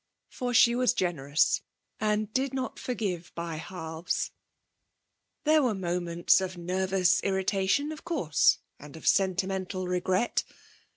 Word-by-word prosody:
For 250 -2 -3
she 235 0 +6
was 250 0 +2
generous 150 -5 +1 0.4
and 215 0 0
did 265 0 0
not 260 -1 -3
forgive 195 -8 -3
by 170 -1 -4
halves. 165 -1 -4 1.1
There 310 0 +4
were 245 -6 +1
moments 175 -1 +1
of 185 -1 -4
nervous 185 +1 +1
irritation, 195 +8 +1
of 310 - -8
course, 180 - +2 0.2
and 145 +1 -12
of - - -12
sentimental 190 -1 +1
regret. 185 +5 0
190 Hz, 120 wpm, -28 LUFS, 175-225 Hz, 1.1 s, she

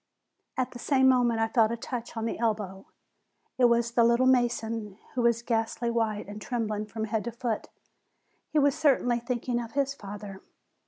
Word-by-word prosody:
At 255 - 0
the 245 - -9
same 265 0 +3
moment 245 -3 +3
I 225 - +2
felt 225 -1 +3
a 235 - -2
touch 240 0 -6
on 225 - -2
the 230 - -3
elbow; 210 -4 -2 0.7
it 250 - +6
was 235 0 +3
the 235 0 +4
"little 235 +2 +4
mason," 230 -5 +1 0.2
who 255 - 0
was 235 0 +2
ghastly 235 0 -1
white 220 -3 -1
and 205 +1 -8
trembling 215 -3 -2
from 220 +1 -5
head 220 -1 -1
to 235 - -3
foot. 230 -1 -3 0.8
He - - -1
was 285 -1 +4
certainly 265 -6 +2
think 240 +1 -4
ing 240 -1 +1
of 230 -1 -8
his 275 0 +1
father. 200 -4 -9
235 Hz, 190 wpm, -28 LUFS, 220-245 Hz, 0.8 s, it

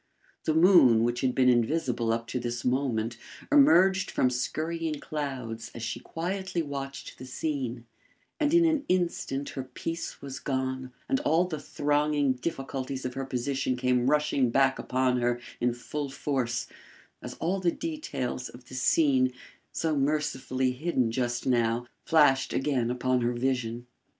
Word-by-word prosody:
The 155 - +1
moon, 160 - +6
which 120 +1 0
had 130 -2 +1
been 130 -1 +4
invisible 120 -1 +2
up 115 0 -1
to 125 - -2
this 120 0 -4
moment, 120 -3 0 0.3
emerged 190 - +5
from 125 - +2
skurrying 160 +4 -2
clouds 130 -8 -5
as 115 - -6
she - - -3
quietly 185 +1 -3
watched 140 -1 -6
the 130 - -8
scene; 130 -4 -3 0.5
and 300 -1 +2
in 340 0 +5
an 315 -3 +2
instant 170 -6 0
her 135 - -5
peace 165 +6 -5
was 135 -1 -7
gone 130 -2 -2 0.2
and 270 - +1
all 175 - +2
the 160 -4 -4
thronging 145 -1 +1
difficulties 135 -1 -4
of 125 - -3
her 135 +1 -3
position 130 0 -1
came 125 0 +2
rushing 150 -4 +2
back 135 +2 +3
upon 125 -1 +1
her 120 0 +1 0.2
in 120 0 +2
full 140 +4 -5
force, 135 -3 -1 0.6
as - - -7
all 185 +4 -1
the 175 -2 +2
details 295 - -4
of 125 0 -14
the - - -11
scene, 130 0 +3 0.4
so 160 -2 -1
mercifully 135 -3 0
hidden 130 -3 0
just 120 0 -1
now, 120 -1 +1 0.2
flashed 145 -5 +4
again 130 -4 0
upon 125 0 +1
her 120 +1 +1
vision. 120 -1 -1
130 Hz, 150 wpm, -28 LUFS, 125-155 Hz, 0.6 s, moon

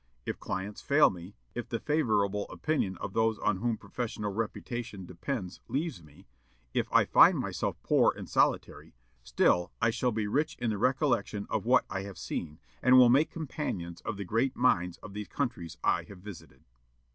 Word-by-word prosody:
If - - -4
clients 95 +2 -4
fail 145 +2 +5
me; 90 +2 -10 0.2
if 120 - -5
the 115 - -2
favorable 105 -9 +1
opinion 120 - -1
of 95 - -6
those 110 0 +2
on 100 - 0
whom 115 +2 -1
professional 105 -1 -4
reputation 115 -1 -4
depends 90 +2 -5
leaves 145 - -2
me; 75 -2 -18 0.5
if - - -1
I - - +5
find - - +6
myself - - -2
poor - - +4
and - - -7
solitary, - - 0 0.3
still 60 +8 +2
I 115 0 +3
shall 120 +2 0
be 110 -1 -1
rich 145 +9 0
in 120 -2 -1
the 105 - -3
recollection 130 -5 +1
of - - -1
what - - +5
I 95 0 -3
have 100 -1 -8
seen, 75 -2 -5 0.2
and 130 +1 +6
will 125 -1 +8
make 140 +6 +4
companions 105 - -5
of - - -4
the 100 - -5
great 120 +8 0
minds 90 -8 +2
of 100 - -9
these 105 -1 -5
countries 120 - -3
I - - +3
have 100 - -12
visited." 90 -9 -12
105 Hz, 180 wpm, -30 LUFS, 95-125 Hz, 0.5 s, will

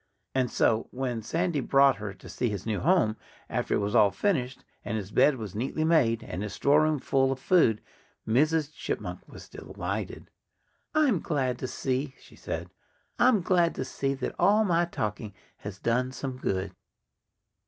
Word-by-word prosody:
And 130 -2 +1
so, 110 0 +1
when 125 -3 -3
Sandy 165 - -1
brought 135 0 +4
her 105 -2 -5
to - - -14
see 125 - -2
his 100 -3 -5
new 110 -3 -1
home, 165 -12 +2 0.3
after - - 0
it - - 0
was 100 +1 -2
all 105 -4 +6
finished, 135 - -1 0.2
and 105 +2 -3
his 100 -1 -6
bed 145 - +4
was 105 -5 -6
neatly 130 +8 -2
made, 135 -9 +3
and 90 - -5
his 105 -1 -4
storeroom 155 +2 +3
full 135 0 +1
of 135 - -2
food, 130 - +3 0.4
Mrs. 150 +5 +2
Chipmunk - - -4
was - - -12
delighted. - - -6 0.6
"I'm 285 - +3
glad 130 -6 -1
to 130 - -3
see 130 +2 -2
" - - -26
she - - -17
said - - -5 0.5
"I'm 245 -5 +5
glad 175 -1 +2
to 130 - -3
see 135 +1 -2
that 130 - -4
all 215 +2 +4
my 175 -2 +2
talking 105 - -4 0.2
has 100 -2 -8
done 125 +5 0
some 130 0 -5
good." 95 -5 -2
130 Hz, 175 wpm, -28 LUFS, 110-155 Hz, 0.6 s, all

